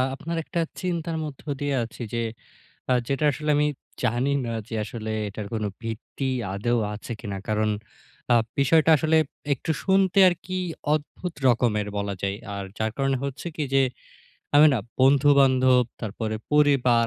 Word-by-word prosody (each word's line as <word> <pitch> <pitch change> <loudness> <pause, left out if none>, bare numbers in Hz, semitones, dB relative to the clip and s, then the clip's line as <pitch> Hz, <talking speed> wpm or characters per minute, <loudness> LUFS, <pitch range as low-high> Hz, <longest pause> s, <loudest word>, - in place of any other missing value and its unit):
আপনার 165 +4 -4
একটা 170 +2 -3 0.2
চিন্তার 170 -2 -2
মধ্য 145 -3 -8 0.2
দিয়ে 145 -1 0
আছি 115 +2 -9
যে 120 - 0 0.7
আ - - +6
যেটা 140 +2 0
আসলে 150 +3 -4
আমি 150 0 +3 0.4
জানি 125 +3 +1
না 115 - -3 0.2
যে 115 - -5
আসলে 110 0 -5 0.2
এটার 105 0 -6
কোনো 110 -2 -1 0.2
ভিত্তি 115 +4 -4 0.3
আদৌ 120 +5 0 0.2
আছে 105 +3 -8
কিনা। 100 -4 -5
কারণ 110 0 +1 0.6
আ - - +6 0.2
বিষয়টা 155 +4 +4
আসলে 155 +2 +3 0.4
একটু 140 - -3
শুনতে 190 0 +3
আর - - 0
কি 185 0 -3 0.4
অদ্ভুত 155 +3 -3
রকমের 115 -4 +2
বলা 100 0 -2
যায়। 100 0 -1 0.2
আর 100 - -4
যার 110 0 -1
কারণে 135 -1 +1
হচ্ছে 140 +4 -5
কি 155 - 0
যে 135 - +5 0.7
আমি 150 +1 +8
না - - +1 0.2
বন্ধুবান্ধব, 130 -2 +5 0.2
তারপরে 110 0 -3 0.2
পরিবার, 135 -6 +4
130 Hz, 155 wpm, -25 LUFS, 110-150 Hz, 0.7 s, আমি